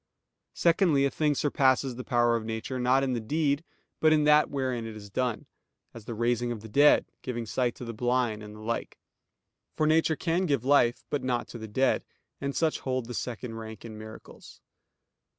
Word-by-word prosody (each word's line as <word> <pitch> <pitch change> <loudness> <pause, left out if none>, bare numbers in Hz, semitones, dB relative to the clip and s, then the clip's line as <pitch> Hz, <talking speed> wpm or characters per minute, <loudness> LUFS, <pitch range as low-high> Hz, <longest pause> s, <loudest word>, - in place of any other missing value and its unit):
Secondly, 165 -5 +3
a 140 - 0
thing 150 -2 +1
surpasses 135 -2 +2
the 125 - -6
power 120 -1 +2
of 115 - -2
nature, 110 +3 -4
not 130 +2 +3
in 130 -2 0
the 120 - -1
deed, 145 +5 0 0.4
but 155 - +4
in 155 -1 +4
that 150 0 +5
wherein 130 -4 -2
it 110 - -8
is 100 -2 -11
done; 125 +1 -1 0.5
as 115 -3 -11
the 115 - -5
raising 120 +1 0
of 115 -3 -5
the 110 - -9
dead, 145 +7 +5
and - - -46
giving 120 -2 -4
sight 125 +2 -1
to 125 - -8
the 115 - -5
blind, 120 -1 0
and 105 0 -10
the 105 - -11
like; 115 +2 -4 0.8
for 155 - +1
nature 160 +1 +3
can 170 +4 0
give 140 -5 0
life, 120 -4 +3
but 145 - 0
not 125 -2 -1
to 120 - -8
the 110 - -7
dead; 130 +5 +1 0.4
and 140 0 -3
such 160 -2 +1
hold 130 -2 -2
the 120 - -7
second 120 -1 -5
rank 110 0 -8
in 110 -2 -8
miracles. 110 +1 -12
125 Hz, 205 wpm, -28 LUFS, 115-140 Hz, 0.8 s, that